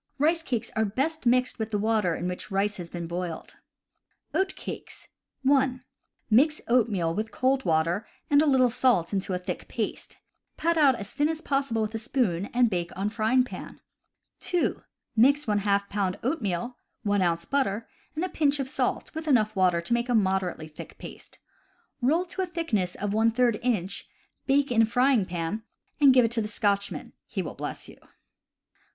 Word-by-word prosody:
Rice 320 +4 +2
cakes 240 -7 -3
are 220 - +2
best 270 +7 -1
mixed 250 +1 +2
with 220 0 -2
the 210 - 0
water 210 -5 +1
in 175 - -3
which 180 +3 -5
rice 200 +1 0
has 175 -2 -7
been 170 0 -5
boiled. 170 -1 -5 0.8
Oat 380 0 0
Cakes. - - -8 0.2
— - - -53
(1) 265 -2 +2 0.4
Mix 285 +7 +4
oatmeal 210 -9 +2
with 215 +4 -2
cold 260 +3 +1
water 165 +6 +1 0.2
and 285 0 +5
a 310 - +2
little 255 -3 +4
salt 230 -8 +2
into 190 -1 -1
a - - 0
thick 180 0 -5
paste, 220 -3 -4 0.4
pat 335 +2 +1
it 320 - +2
out 270 -3 +6
as 200 -3 -6
thin 295 +1 +1
as 320 -1 -2
pos 275 -4 -1
sible 225 -1 +1
with 215 +1 -3
a 225 - -2
spoon, 215 -7 0
and 245 0 +4
bake 175 -2 -1
on 200 +2 0
the - - -14
frying 235 +4 +3
pan. 250 - -9 0.6
(2) 355 -1 0 0.3
Mix 280 +5 +4
h 205 -1 +2
pound 195 -2 -1
oatmeal, 240 - -2 0.3
1 205 -2 +1
ounce 170 -1 +1
butter, 230 -6 0 0.3
and 325 +4 -1
a - - -4
pinch 290 -4 +1
of 270 - -1
salt 295 - -2
with 320 0 -6
enough 220 -6 +3
water 180 -3 +3
to 170 - -2
make 235 +1 0
a 245 - +3
moderately 190 -5 0
thick 150 - -11
paste. - - -11 0.6
Roll 315 +9 +2
to 375 +2 -4
a 370 - -1
thickness 235 - -1
of 205 0 -3
J 230 +1 +2
inch, 200 -6 -1 0.4
bake 280 0 +3
in 225 -2 +5
frying 245 -3 +3
pan, 175 +5 -3 0.4
and 285 -2 +7
give 250 -2 +6
it 230 - -1
to 235 -1 +1
the 210 - -2
Scotchman 200 -2 -1
— - - -62
he - - -3
will - - -6
bless - - -6
you. - - -13
225 Hz, 190 wpm, -27 LUFS, 195-270 Hz, 0.8 s, and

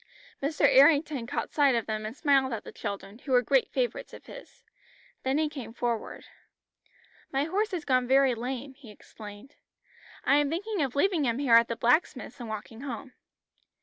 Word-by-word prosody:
Mr. 285 +2 +1
Errington 285 -2 +4
caught - - -4
sight 280 -4 +4
of 230 - -1
them 215 -1 -3
and 225 +5 -9
smiled 275 -3 +2
at 225 - -5
the - - -10
children, 200 +1 -7
who 275 - -8
were 250 0 +5
great 265 +2 +2
favourites 245 -3 -3
of - - -14
his. - - -13 0.6
Then 265 +2 0
he 310 0 +1
came 260 -7 -8
forward. 235 -2 -3 1.1
"My 275 +1 +1
horse 405 +8 -1
has 360 -7 -5
gone 255 -2 +2
very 265 0 +4
lame," 255 +3 -5
he 265 -4 -15
explained. 210 +4 -13 0.7
"I 280 - +4
am 290 -1 +2
thinking 390 +4 -2
of 270 -3 -2
leaving 330 0 +2
him 235 -1 0
here 270 -4 +1
at 230 0 +7
the 230 - -3
blacksmith's 250 +1 0
and 235 -2 -7
walking 220 +2 -7
home." 255 -1 -7
265 Hz, 180 wpm, -28 LUFS, 230-290 Hz, 1.1 s, at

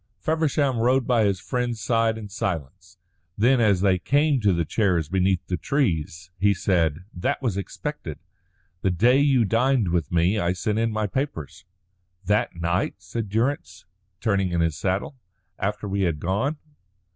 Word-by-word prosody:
Feversham 155 -5 0
rode 125 +2 +2
by 115 -3 +3
his 100 -2 +1
friend's 120 0 -2
side 115 -1 +1
in 110 -2 -7
silence. 95 - -5 0.4
Then, 120 +4 +4
as 100 -5 +3
they 95 -2 +3
came 145 - +2
to 105 -2 +3
the 85 -2 0
chairs 90 -5 +1
beneath 95 0 +1
the 90 - -2
trees, 85 - -1
he 100 +1 +3
said: 85 -3 0
"That 90 - -1
was 120 -8 -1
expected. 100 - -5 0.6
The 95 - +1
day 120 +9 +4
you 135 -5 +3
dined 115 -1 +2
with 85 -4 -1
me 90 +5 +2
I 85 0 +1
sent 105 +4 -1
in 115 0 +1
my 110 0 -1
papers." 95 - -4 0.6
"That 105 -1 +1
night?" 85 +2 -1
said 115 -3 -5
Durrance, 110 - -2 0.3
turning 100 -3 +1
in 85 -1 +1
his 80 -2 +1
saddle. 95 - -2 0.4
"After 105 +1 -2
we 100 0 -1
had 85 -5 0
gone?" 105 - -1
100 Hz, 160 wpm, -24 LUFS, 90-120 Hz, 0.6 s, Then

